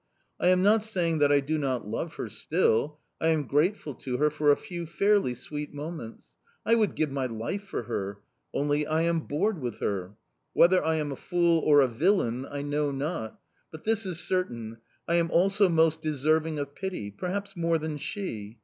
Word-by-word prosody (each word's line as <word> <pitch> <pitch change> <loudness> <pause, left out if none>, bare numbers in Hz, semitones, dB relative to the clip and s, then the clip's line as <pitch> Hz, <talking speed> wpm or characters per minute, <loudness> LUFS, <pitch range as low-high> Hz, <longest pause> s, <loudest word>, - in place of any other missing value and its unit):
I - - +2
am 185 0 +4
not 210 +2 +4
saying 175 -7 0
that 145 -1 +4
I 145 -1 +5
do 155 +3 -1
not 130 -6 -2
love 155 +10 -4
her - - -4
still; 150 -3 0 0.2
I 160 - +1
am 160 -3 +2
grateful 150 +2 +1
to 125 0 -4
her 150 +2 +2
for 150 0 +3
a - - +5
few 170 -2 -6
fairly 200 -6 +2
sweet 150 +3 -6
moments; 145 - -8 0.3
I 230 - +3
would 220 -3 +2
give 155 -3 0
my 135 -2 -1
life 120 - -4
for 195 - -4
her 100 -3 -4 0.3
only 145 +1 0
I 160 +1 +1
am 170 0 +2
bored 160 +5 -1
with 120 -3 -4
her... 95 0 -3 0.4
Whether 180 0 +5
I 160 +1 +1
am 150 -2 -2
a - - -3
fool 170 +2 +2
or 145 -2 +5
a 135 - +4
villain 130 - +1
I 145 0 -4
know 145 0 0
not; 135 -5 -4 0.3
but 155 - -11
this 225 -2 +1
is 175 -2 -1
certain, 115 -12 -2 0.3
I 170 - +2
am 170 -1 +1
also 195 +3 +4
most 160 -1 +3
deserving 155 +1 +1
of 140 -1 -4
pity 180 - -5
perhaps 195 - -4
more 170 -1 +1
than 155 -1 -4
she. 115 - -5
155 Hz, 195 wpm, -28 LUFS, 140-175 Hz, 0.4 s, I